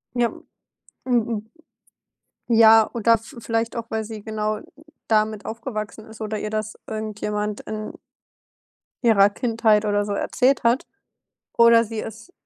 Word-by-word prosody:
Ja. 240 -1 +2 0.7
Mm 230 -3 0 1.1
ja, 225 -1 +7
oder 230 0 +4
v 225 +4 -14
vielleicht 230 0 -2
auch, 230 -1 -5
weil 220 0 0
sie 215 -1 -8
genau 215 -1 -2 0.5
damit 215 -1 +1
aufgewachsen 220 -2 -6
ist 220 0 -13
oder 215 0 -3
ihr 210 0 -4
das 215 0 -3
irgendjemand 210 -1 -3
in 215 0 -6 1.1
ihrer 205 -4 +5
Kindheit 220 -1 +2
oder 205 0 +1
so 205 - -3
erzählt 255 +6 +1
hat 235 +3 +2 0.7
oder 235 0 +6
sie 225 0 -5
es 220 - -9
220 Hz, 130 wpm, -23 LUFS, 215-230 Hz, 1.1 s, ja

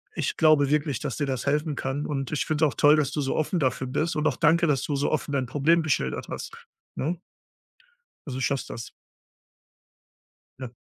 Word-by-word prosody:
ich - - -2
glaube 155 -3 +5
wirklich, 145 -3 0
dass 140 -5 -4
dir 145 - 0
das 130 -3 -2
helfen 150 +1 0
kann, 135 +2 -3
und 135 -2 -3
ich 150 - -1
finde 155 0 +2
es 150 - +3
auch - - -12
toll, 145 +1 +6
dass 145 -2 +1
du 150 - -3
so 135 - -1
offen 165 +3 0
dafür 130 -1 0
bist, 155 +5 -1
und 155 0 +1
auch 145 - 0
danke, 170 +2 +4
dass 140 -4 +2
du 145 - -2
so 140 - 0
offen 150 -1 -1
dein 130 -2 0
Problem 155 +6 +3
geschildert 100 - -1
hast, - - -6 0.4
ne? 165 +5 -2 1.1
Also, 130 -3 -5
du - - -3
schaffst 140 0 -1
das. 115 0 -7 1.7
Ja. 125 -2 -7
145 Hz, 205 wpm, -26 LUFS, 135-155 Hz, 1.7 s, toll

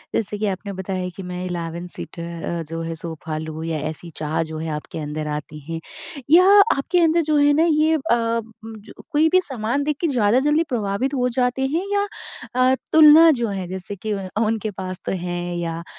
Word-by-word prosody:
जैसे 210 -1 -1
कि 215 - -1
आपने 200 +1 -4
बताया 185 -1 -3
कि 195 - -7
मैं 180 0 -5
11 175 -1 -4
सीटर 170 -1 -7
अ, 170 -1 -2
जो 165 0 -4
है 165 0 -4
सोफा 160 -1 -6
लूँ 155 0 -6
या 165 -1 -2
ऐसी 160 +2 -7
चाह 155 +1 -1
जो 160 0 -7
है 160 +1 -4
आपके 150 +1 -7
अंदर 150 +1 -4
आती 150 0 -5
है 165 0 -3 0.5
या 345 +4 +7 0.3
आपके 350 +6 +1
अंदर 330 0 +4
जो 305 -1 +1
है 290 0 +5
न - - +5
ये 310 +1 +3
अ, 315 - 0 0.7
जो 220 -2 -10 0.2
कोई 305 +2 +4
भी 370 +2 +4
सामान 260 -2 -2
देख 300 0 -1
के 340 - +2
ज़्यादा 240 -4 +3
जल्दी 295 +4 +2
प्रभावित 225 +3 -1
हो 250 -2 +1
जाते 255 +1 +1
हैं 345 - 0
या 405 0 +1 0.5
अ, 255 +1 +4 0.2
तुलना 315 +1 +8
जो 235 - +1
है 190 -3 -4
जैसे 190 +2 -6
कि 215 +3 -4
उ 195 -2 -4 0.2
उनके 220 -1 -1
पास 185 -1 -6
तो - - -1
हैं 175 -1 -3
या 165 -1 -3
195 Hz, 205 wpm, -22 LUFS, 170-270 Hz, 0.7 s, तुलना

